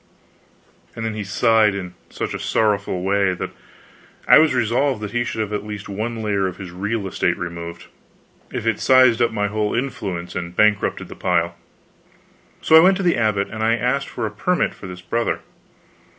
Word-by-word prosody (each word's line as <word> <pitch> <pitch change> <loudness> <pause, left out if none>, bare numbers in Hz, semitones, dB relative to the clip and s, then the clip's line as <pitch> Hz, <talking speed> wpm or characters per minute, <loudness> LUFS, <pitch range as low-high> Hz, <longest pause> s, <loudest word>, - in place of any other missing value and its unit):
And 115 - -4
then 110 - -2
he 105 -1 -4
sighed 105 +1 +3
in 90 -2 -6 0.2
such - - -4
a - - -4
sorrowful 105 -4 0
way 100 -1 +1
that - - -5 0.8
I - - +9
was 155 -4 +3
resolved 120 -1 +1
he 120 0 0
should 110 - -3
have 105 -1 -3
at 105 - -2
least 105 -1 -7
one 110 +3 -4
layer 100 -2 0
of 90 - -6
his 95 -3 -8
real 105 +4 -3
estate 95 - 0
removed, 85 0 -6 0.7
if - - -4
it - - +1
sized 130 -3 +5
up 120 - +4
my 105 -2 -1
whole 105 0 -1
influence 95 -9 -3
and 85 0 -5
bankrupted 105 0 +2
the - - -10
pile. 85 0 0 1.1
So 160 - +5
I - - +11
went 185 +3 +5
to 195 - -3
the 175 -2 +3
abbot 105 -4 0
and 110 0 -6
asked 125 +5 +1
for - - -4
a 105 - -3
permit 180 +12 0
for 95 - -10
this 90 -1 -9
Brother. 115 +5 -1
105 Hz, 185 wpm, -21 LUFS, 95-115 Hz, 1.1 s, I